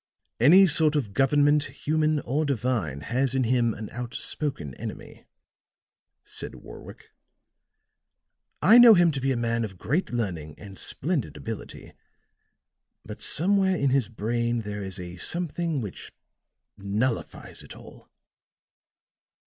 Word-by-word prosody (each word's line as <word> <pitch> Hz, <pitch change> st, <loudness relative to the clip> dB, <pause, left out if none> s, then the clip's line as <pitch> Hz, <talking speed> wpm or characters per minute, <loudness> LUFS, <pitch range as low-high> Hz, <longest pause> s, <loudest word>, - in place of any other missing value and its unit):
"Any 175 Hz, +11 st, +7 dB
sort 155 Hz, -3 st, +3 dB
of 115 Hz, -9 st, -2 dB
government, 145 Hz, +4 st, +3 dB
human 155 Hz, -1 st, -1 dB
or 145 Hz, +6 st, -1 dB
divine, 115 Hz, -, -1 dB
has 130 Hz, -, -1 dB
in 130 Hz, -, +2 dB
him 120 Hz, -2 st, +1 dB
an 110 Hz, -1 st, -8 dB
outspoken 120 Hz, -, -4 dB
enemy," -, -, -8 dB, 1.0 s
said -, -, -7 dB
Warwick. -, -, -13 dB, 1.5 s
"I 235 Hz, +3 st, +8 dB
know 235 Hz, -2 st, +9 dB
him 175 Hz, -2 st, +4 dB
to 140 Hz, -2 st, -4 dB
be 135 Hz, +1 st, +1 dB
a 130 Hz, -, 0 dB
man 115 Hz, 0 st, -1 dB
of 95 Hz, -4 st, -6 dB
great 160 Hz, -, -1 dB
learning 85 Hz, -11 st, -3 dB
and 100 Hz, -2 st, -11 dB
splendid 155 Hz, -2 st, -2 dB
ability, 115 Hz, -1 st, -8 dB, 1.1 s
but 105 Hz, -, -9 dB
somewhere 190 Hz, +2 st, +2 dB
in 140 Hz, -5 st, +1 dB
his 130 Hz, -5 st, +1 dB
brain 120 Hz, +2 st, -1 dB
there 105 Hz, -1 st, -6 dB
is 95 Hz, 0 st, -6 dB
a 90 Hz, 0 st, -8 dB
something 170 Hz, -, -3 dB
which 105 Hz, -5 st, -8 dB, 0.7 s
nullifies 105 Hz, +5 st, -3 dB
it -, -, -12 dB
all." -, -, -15 dB
125 Hz, 125 wpm, -26 LUFS, 105-150 Hz, 1.5 s, know